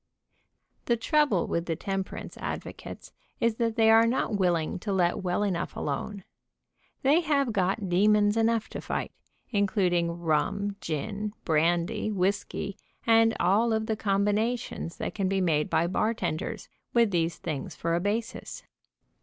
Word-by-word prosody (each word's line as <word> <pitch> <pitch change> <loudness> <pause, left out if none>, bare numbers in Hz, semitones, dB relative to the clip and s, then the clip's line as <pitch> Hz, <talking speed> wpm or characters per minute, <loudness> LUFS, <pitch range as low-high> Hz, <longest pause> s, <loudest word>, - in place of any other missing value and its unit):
The 235 - +2
trouble 285 - +2
with 170 +1 -2
the 165 - 0
temperance 195 +1 -4
advocates - - -7 0.3
is 230 -1 +1
that 230 -2 0
they 225 -1 +5
are 225 +1 +6
not 230 -3 0
willing 175 -4 +1
to 200 +3 -4
let 185 +1 +1
well 180 +2 0
enough 185 -4 -2
alone. 190 +7 -3 0.8
They 285 +5 +5
have 280 -7 +1
got 195 +1 0
demons 205 +3 +4
enough 225 0 +2
to - - -6
fight, - - -3 0.4
including 185 -5 +1
rum, 175 +5 0
gin, 205 +7 -3
brandy, 170 +7 +1
whisky, 200 0 -1 0.3
and 225 0 +5
all 215 +6 +3
of 220 0 0
the 220 - -1
combinations 210 -1 -1
that - - -4
can 195 -3 -1
be 195 0 +1
made 155 -5 +1
by 165 +1 +2
bartenders, 200 -2 -2 0.3
with 230 -3 +4
these 165 -1 0
things 145 -4 -5
for 165 0 -1
a 170 - +2
basis. 210 +5 -3
200 Hz, 145 wpm, -28 LUFS, 175-225 Hz, 0.8 s, are